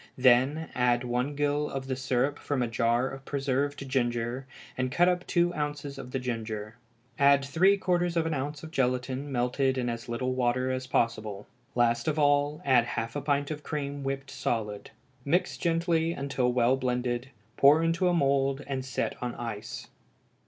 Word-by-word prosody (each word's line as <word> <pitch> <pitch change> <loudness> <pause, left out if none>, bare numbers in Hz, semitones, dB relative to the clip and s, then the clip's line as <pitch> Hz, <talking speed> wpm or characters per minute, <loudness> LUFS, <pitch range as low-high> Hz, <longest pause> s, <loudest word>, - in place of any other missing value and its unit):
Then 130 +5 +4
add 125 -1 +2
one 125 +4 -1
gill 145 +1 0
of 135 -1 -4
the 130 -1 -2
syrup 130 +2 0
from 140 -4 -1
a - - 0
jar 115 +2 +1
of 135 0 -8
preserved 140 0 -1
ginger, 120 0 -1 0.3
and 130 0 -1
cut 175 +6 +4
up 180 0 0
two 175 0 +2
ounces 145 -2 -4
of 125 -2 -8
the 135 - -2
ginger; 110 -4 -4 0.4
add 140 0 +5
three 185 +8 +4
quarters 175 -2 0
of 165 - +2
an 165 - -1
ounce 145 +2 -4
of 160 - -8
gelatine 130 0 -1
melted 130 +1 +1
in 125 -1 0
as 115 0 -5
little 130 +2 -1
water 130 0 +1
as 130 0 -3
possible. 110 -5 -1 0.3
Last 120 +1 +2
of 155 -1 +1
all, 145 +2 +2
add 125 -4 +5
half 115 +1 -3
a 145 - -2
pint 145 0 0
of 150 -1 -4
cream 145 -2 -4
whipped 135 0 -4
solid. 105 -3 -3 0.3
Mix 175 +6 +1
gently 165 -1 +1
and 140 -2 -5
till 125 -2 +2
well 125 +1 +3
blended; 125 0 -1 0.3
pour 150 +4 +6
into 165 +2 +2
a 180 - +3
mould, 140 -2 +1
and 135 -2 -3
set 130 -1 -2
on 125 -1 -3
ice. 115 -3 -6
135 Hz, 180 wpm, -28 LUFS, 125-145 Hz, 0.4 s, pour